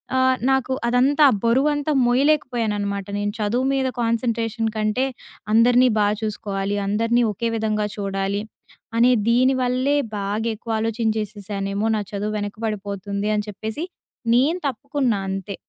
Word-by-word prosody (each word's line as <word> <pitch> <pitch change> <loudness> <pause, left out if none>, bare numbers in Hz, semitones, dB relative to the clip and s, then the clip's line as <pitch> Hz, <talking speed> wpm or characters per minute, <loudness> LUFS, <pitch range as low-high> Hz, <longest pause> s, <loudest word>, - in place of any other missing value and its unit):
ఆహ్, 260 0 +4 0.2
నాకు 265 -1 +1
అదంతా 260 +5 +3
ఆ - - +1
బరువంతా 290 +5 +2
మోయలేకపోయాన్ననమాట. 240 -7 +1
నేను 205 0 -1
చదువు 235 +5 0
మీద 265 -1 +1
కాన్సంట్రేషన్ 230 -1 0
కంటే 215 +4 +1 0.5
అందరిని 245 +2 +5
బా 205 - +4
చూసుకోవాలి. 200 -2 -2
అందరిని 230 +4 +2
ఒకే 230 +3 -2
విధంగా 215 -1 0
చూడాలి. 195 0 -2 0.6
అనే 240 +2 +5 0.2
దీని 255 +3 +4
వల్లే 255 +3 +1 0.2
బాగా 205 +3 -2
ఎక్కువ 230 +2 -7
ఆలోచించేసేసానేమో 215 -2 -2
నా 210 - -1
చదువు 210 +1 -3
వెనకబడిపోతుంది, 205 -1 -3
అని 210 0 -1
చెప్పేసి 220 - -5 0.5
నేను 300 +9 +3
తప్పుకున్నా 270 -3 -1
అంతే. 195 +1 -4
225 Hz, 120 wpm, -22 LUFS, 205-250 Hz, 0.6 s, అందరిని